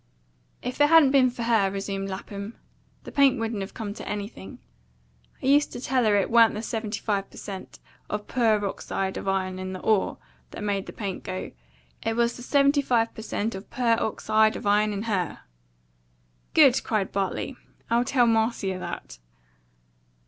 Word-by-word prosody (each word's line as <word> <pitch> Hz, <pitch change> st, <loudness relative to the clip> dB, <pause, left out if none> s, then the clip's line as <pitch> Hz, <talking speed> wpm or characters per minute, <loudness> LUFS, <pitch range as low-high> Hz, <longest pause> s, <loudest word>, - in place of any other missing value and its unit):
"If 250 Hz, +3 st, -3 dB
it 290 Hz, -, +6 dB
hadn't 320 Hz, -4 st, +7 dB
been 265 Hz, -2 st, +5 dB
for 240 Hz, -1 st, -5 dB
her," 225 Hz, -4 st, +3 dB
resumed 195 Hz, 0 st, -4 dB
Lapham, 200 Hz, +3 st, -6 dB, 0.5 s
"the -, -, -9 dB
paint 275 Hz, -2 st, +4 dB
wouldn't 225 Hz, -2 st, -2 dB
have 195 Hz, -, -7 dB
come 210 Hz, -3 st, -4 dB
to -, -, -8 dB
anything. 205 Hz, -, -6 dB, 0.9 s
I -, -, -3 dB
used 285 Hz, +2 st, +4 dB
to -, -, -5 dB
tell 255 Hz, -1 st, +1 dB
her 210 Hz, -1 st, +4 dB
it 200 Hz, +1 st, +1 dB
wa'n't 230 Hz, -2 st, +6 dB
the 215 Hz, -, -4 dB
seventy 220 Hz, -2 st, -3 dB
five 200 Hz, -2 st, -1 dB
per -, -, -15 dB
cent. 195 Hz, -2 st, -8 dB, 0.3 s
of 210 Hz, 0 st, -3 dB
purr 220 Hz, -4 st, +2 dB
ox 195 Hz, -, -6 dB
eyed 190 Hz, 0 st, -1 dB
of -, -, -6 dB
iron 190 Hz, -1 st, -1 dB
in 185 Hz, 0 st, -5 dB
the 185 Hz, -, -6 dB
ORE 215 Hz, -3 st, +1 dB, 0.3 s
that -, -, -8 dB
made 200 Hz, -2 st, -1 dB
that -, -, -10 dB
paint 200 Hz, -3 st, -4 dB
go; 185 Hz, 0 st, -5 dB, 0.5 s
it 225 Hz, -, -1 dB
was 235 Hz, 0 st, +1 dB
the -, -, -10 dB
seventy 280 Hz, +2 st, +3 dB
five 235 Hz, -4 st, +1 dB
per -, -, -8 dB
cent. 220 Hz, 0 st, -2 dB
of 190 Hz, +2 st, -8 dB
purr 240 Hz, -3 st, +2 dB
ox 220 Hz, -, -3 dB
eyed 220 Hz, 0 st, +4 dB
of -, -, -7 dB
iron 210 Hz, +1 st, +3 dB
in 205 Hz, 0 st, -3 dB
HER." 190 Hz, -7 st, -2 dB, 1.1 s
"Good!" 275 Hz, -5 st, +6 dB
cried 215 Hz, -5 st, -1 dB
Bartley. 195 Hz, +6 st, -2 dB, 0.4 s
"I'll 235 Hz, +1 st, +4 dB
tell 250 Hz, -1 st, +3 dB
Marcia 220 Hz, -4 st, +1 dB
that." -, -, -7 dB
215 Hz, 185 wpm, -26 LUFS, 195-240 Hz, 1.1 s, hadn't